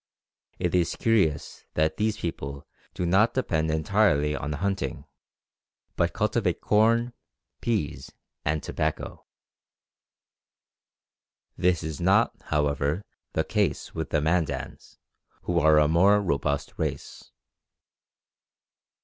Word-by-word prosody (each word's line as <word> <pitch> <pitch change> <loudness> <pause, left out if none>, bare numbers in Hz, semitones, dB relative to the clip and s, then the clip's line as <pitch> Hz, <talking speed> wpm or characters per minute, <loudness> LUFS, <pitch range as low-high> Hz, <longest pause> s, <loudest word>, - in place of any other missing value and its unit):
It 90 -2 -1
is 85 -2 +1
curious 95 -10 0
that 80 0 +1
these 110 0 0
people 70 -5 -5 0.3
do 90 - -2
not 95 +6 +3
depend 80 -11 0
entirely 80 -2 +2
on 75 +2 -4
hunting, 90 -4 -2 0.9
but - - +1
cultivate - - 0
corn, 115 +3 +2 0.5
peas, 110 -11 -2 0.3
and 75 +1 -1
tobacco. 80 0 -3 2.3
This 90 -2 +1
is 80 -3 -5
not, - - +4
however, 75 +5 0 0.3
the - - +1
case - - -1
with 80 -1 -4
the 75 - +1
Mandans, 80 +1 -2 0.5
who - - +1
are 80 0 +5
a 75 -1 +5
more 95 +6 +5
robust 70 -6 -1
race. - - -5
80 Hz, 105 wpm, -26 LUFS, 75-100 Hz, 2.3 s, are